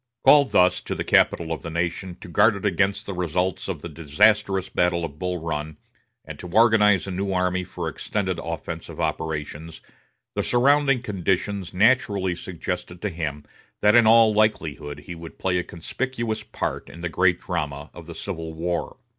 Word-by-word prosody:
Called 145 -2 +7
thus 90 0 +4
to - - -4
the - - -3
capital 85 -1 +3
of 80 - -3
the 85 - -6
nation 85 +2 -3
to - - -9
guard 105 +5 +4
it 100 - -6
against 100 0 +1
the 100 - -5
results 90 +1 -1
of 85 -6 -5
the - - -4
disastrous 95 +5 +2
battle 90 -1 +1
of 75 -2 -10
Bull 90 -1 -2
Run, 80 -2 -4 0.5
and - - -9
to 90 - -7
organize 105 -1 +4
a 95 - -5
new 95 +2 -2
army 90 0 0
for - - -6
extended 95 -4 -2
offensive 85 0 -6
operations, 80 0 -3 0.5
the - - -1
surrounding 140 +1 +3
conditions 95 -1 -1
naturally 100 -3 +2
suggested 90 0 -5
to 105 - 0
him 75 -4 -4 0.4
that 105 0 +5
in 120 -2 +6
all 115 -1 +6
likelihood 80 -9 0
he 85 - -8
would 85 -1 -10
play 90 -1 0
a - - -2
conspicuous 115 +7 -4
part - - -4
in 85 - -11
the 85 - -2
great 90 +1 +2
drama 75 -4 -4
of 85 -2 -11
the 85 - -8
Civil 80 -4 -6
War. 85 +6 -3
90 Hz, 175 wpm, -24 LUFS, 85-105 Hz, 0.5 s, Called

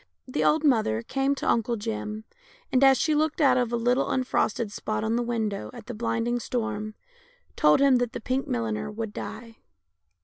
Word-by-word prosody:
The 255 - -1
old 310 +1 +3
mother 220 - +2
came 270 - 0
to - - -4
Uncle 235 +1 +1
Jim, 215 0 -4 0.5
and, 260 +1 +3
as 270 -1 +7
she 310 - +1
looked 310 +1 0
out 270 -5 +5
of 245 -2 +1
a - - +1
little 245 +3 +1
unfrosted 240 -4 0
spot 215 +1 -3
on 220 +1 0
the 240 - +1
window 225 -4 -2
at 235 -3 -10
the 245 - -6
blinding 235 +1 -1
storm, 215 -3 -3 0.6
told 150 0 +4
him 275 -2 +5
that 245 -2 -1
the - - -4
pink 260 +3 -2
milliner 110 - -2
would 215 0 -5
die. 230 +1 -8
235 Hz, 190 wpm, -26 LUFS, 215-255 Hz, 0.6 s, as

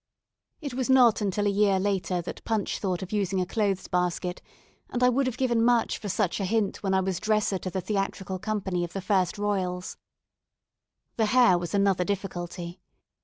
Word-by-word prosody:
It 285 -4 -5
was 260 0 -2
not 245 -4 +5
until 205 0 0
a 205 - +3
year 200 -1 +3
later 185 -2 -1
that - - -7
Punch 220 -3 -1
thought 185 -2 -2
of 185 - -8
using 195 -3 0
a 180 - +1
clothes 195 -1 -1
basket; 180 0 -1 0.5
and 250 0 -1
I 250 - +6
would 260 +2 +1
have 250 -1 -3
given 240 -3 +2
much 235 -1 +2
for 205 - -5
such 190 0 0
a 195 - -1
hint 210 0 0
when 190 -1 0
I 190 - +3
was 185 -2 -2
dresser 215 -3 +1
to 185 - -4
the 190 +1 -3
theatrical 195 -2 -2
company 195 -3 -2
of 175 0 -5
the 195 - -3
1st 185 -1 +1
Royals. 185 -3 -2 1.2
The 220 -2 +2
hair 240 -4 +5
was 175 +3 -2
another 195 -2 +3
difficulty. 180 -2 -5
195 Hz, 190 wpm, -27 LUFS, 185-215 Hz, 1.2 s, I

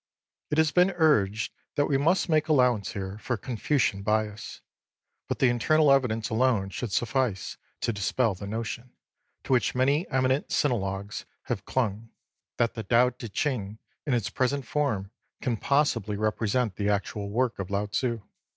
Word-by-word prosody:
It 150 - -1
has 160 -1 +4
been 180 +3 +4
urged 115 - +2 0.2
that 145 - +2
we 140 - 0
must 165 +9 +2
make 155 -2 +2
allowance 125 -9 +2
here 100 +1 -5
for 120 +1 -2
Confucian 115 -1 0
bias; 105 0 -2 0.7
but - - -2
the 130 - +4
internal 145 +5 +3
evidence 120 -5 +2
alone 110 -4 +2
should 120 0 -4
suffice 115 -5 -1 0.2
to 115 - 0
dispel 105 +3 +1
the 100 +2 -8
notion, 115 +3 -5 0.5
to - - 0
which 125 -1 +2
many 140 +6 +2
eminent 130 +1 +1
sinologues 100 -6 -1 0.2
have - - -4
clung, 115 -3 -1 0.5
that 115 -1 +1
the 110 - -4
Tao 120 +4 +3
Ti 120 -2 -8
Ching 110 -4 -2 0.3
in 135 - +2
its 115 -5 -1
present 135 +1 0
form 115 -9 -1 0.3
can 125 -3 -1
possibly 125 -4 +1
represent 110 0 0
the 105 0 0
actual 100 0 -2
work 120 +2 0
of 95 - -4
Lao 100 +1 0
Tzu. 115 +1 -2
120 Hz, 160 wpm, -27 LUFS, 105-130 Hz, 0.7 s, has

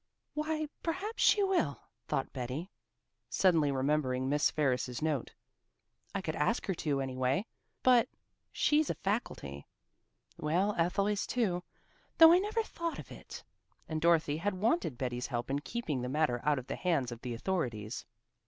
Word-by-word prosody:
"Why, 310 +1 -1
perhaps 385 +7 -3
she 410 - +5
will," 370 - +1 0.3
thought 135 - -1
Betty, 130 +8 -4 0.6
suddenly 165 -6 +3
remembering 130 -1 +1
Miss 145 +2 +3
Ferris's 125 -4 0
note. 155 -5 -1 0.8
"I 195 - 0
could 160 -4 -3
ask 150 +11 +1
her 190 - 0
to, 145 -5 -1
anyway. 130 - 0 0.4
But 250 -2 +5 0.4
she's 300 0 +2
a - - 0
faculty. 70 - -3 0.7
Well, 180 +7 +1
Ethel 175 +4 +1
is 205 -1 0
too, 195 -8 0 0.6
though 325 0 +10
I 355 - +6
never 430 +3 0
thought 335 -5 -4
of - - -9
it." - - -9 0.4
And 155 -1 -3
Dorothy 165 -3 +3
had 190 +4 -1
wanted 210 - +1
Betty's 125 -1 -2
help 120 0 -3
in 140 - +1
keeping 150 - -3
the 125 - -3
matter 130 -4 +1
out 150 -1 +3
of 130 - -5
the - - -4
hands 160 -9 0
of 120 0 -8
the 125 -2 -4
authorities. 120 - -2
155 Hz, 155 wpm, -32 LUFS, 130-210 Hz, 0.8 s, though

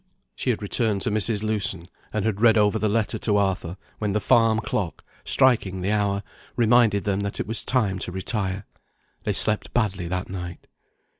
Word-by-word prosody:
She - - -3
had 110 -3 -1
returned 105 -1 0
to - - 0
Mrs. 110 0 0
Lewson, 100 -5 0 0.3
and 105 -2 -2
had 110 -2 -1
read 115 -1 +5
over 105 +1 +3
the 110 - +1
letter 110 0 0
to 105 -2 +1
Arthur, 95 -3 -1 0.2
when 105 -2 -1
the 105 - +1
farm 115 0 +3
clock, 105 -5 -3 0.2
striking 110 -8 +2
the 95 +3 -1
hour, 100 -1 0 0.3
reminded 115 -3 +3
them 100 -1 0
that 100 0 -4
it - - -1
was 110 +2 -1
time 105 -7 0
to 90 - -2
retire. 95 +1 -3 0.6
They - - 0
slept 105 0 +3
badly 100 -7 0
that 90 +2 -3
night. 90 -2 -7
105 Hz, 180 wpm, -24 LUFS, 95-110 Hz, 0.6 s, read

